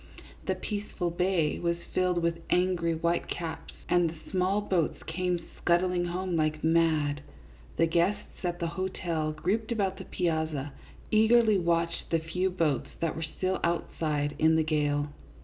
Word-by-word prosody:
The - - +1
peaceful 205 -4 -3
bay 175 -3 +1
was 170 0 0 0.2
filled 180 -2 +1
with 170 0 0
angry 180 -2 +2
whitecaps, 165 0 -2
and 175 -2 +3
the 160 -1 -12
small 190 +2 +2
boats 185 -6 0
came 180 +2 -1 0.2
scudding 175 0 +2
home 180 +1 -2
like 155 -1 0
mad. 160 -3 +2 0.6
The 165 - +5
guests 175 +7 0
at 175 -1 -1
the 170 - -2
hotel, 170 -4 -2
grouped 195 +9 -1
about 195 -4 0
the - - -8
piazza, 160 -5 -1 0.4
eagerly 220 -1 +5
watched 170 -1 0
the 165 - +3
few 170 +4 -1
boats 165 -7 0
that 165 -2 -1
were 160 - -3
still 185 0 0
outside 155 -3 0
in 160 +1 +5
the 160 - +3
gale. 145 -2 +1
170 Hz, 150 wpm, -29 LUFS, 160-185 Hz, 0.6 s, The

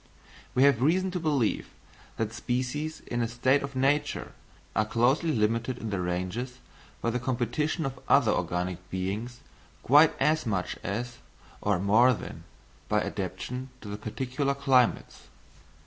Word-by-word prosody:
We 130 - +5
have 140 -4 +5
reason 185 +7 +2
to 180 - -2
believe 145 -9 0 0.5
that 110 0 -2
species 130 +6 -2
in 120 0 -3
a 115 - +1
state 130 +4 +2
of 140 -1 -6
nature 135 +3 +1 0.4
are 110 - +3
closely 125 +9 +2
limited 115 +1 0
in 110 - -5
their 100 -2 -1
ranges 95 +9 -3 0.5
by 115 - +1
the 125 - -1
competition 130 +6 -1
of 135 -1 -4
other 120 -6 +5
organic 90 0 -2
beings 100 +7 -4 0.4
quite 150 +4 +6
as 155 -3 +2
much 95 -4 -1
as, 120 +4 -4 0.4
or 105 -2 +2
more 110 +7 +5
than, - - -8 0.4
by - - +3
adaptation 130 +1 -4
to 105 -1 -6
particular 130 +6 -2
climates. 135 -3 +1
125 Hz, 140 wpm, -28 LUFS, 105-140 Hz, 0.5 s, quite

